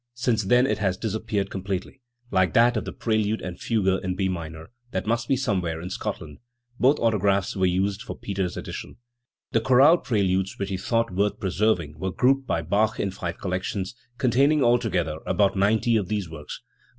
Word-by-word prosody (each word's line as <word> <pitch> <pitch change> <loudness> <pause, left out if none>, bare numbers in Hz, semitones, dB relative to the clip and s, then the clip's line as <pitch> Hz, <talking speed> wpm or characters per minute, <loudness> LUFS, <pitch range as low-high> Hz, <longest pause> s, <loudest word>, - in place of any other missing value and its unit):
Since 120 -4 0
then 125 +5 +4
it 135 - 0
has 95 -3 0
disappeared 105 -2 -2
completely, 95 +6 -4 0.3
like 95 -4 +2
that 120 +1 +5
of 110 - -2
the - - -4
prelude 110 -1 0
and 90 -1 -6
fugue 95 -5 0
in 90 0 -2
B 95 0 0
minor, 80 -1 -6 0.2
that 95 -5 -3
must 115 +1 0
be 135 - +3
somewhere 95 -11 -1
in 90 +3 -7
Scotland. 75 -4 -5 0.4
Both 135 +4 +4
autographs 100 -4 +1
were 95 -1 +2
used 95 +3 0
for 125 - -6
the - - -23
Peters 95 -3 -3
edition. - - -7 0.6
The 115 - +2
chorale 135 +8 +6
preludes 95 -4 0
which 100 0 -3
he 95 - -2
thought 115 +2 0
worth 100 +2 0
preserving 90 -6 0
were 95 - -2
grouped 135 +5 +2
by 85 - 0
Bach 105 +6 +1
in 100 - -1
five 95 -2 -5
collections, 95 +1 -3 0.2
containing 140 +3 +3
al 120 0 +4
together 85 -8 -1
about 100 -1 +2
ninety 110 +4 +2
of 100 -4 -1
these 105 -3 -2
works. 75 -2 -9
100 Hz, 185 wpm, -25 LUFS, 95-115 Hz, 0.6 s, chorale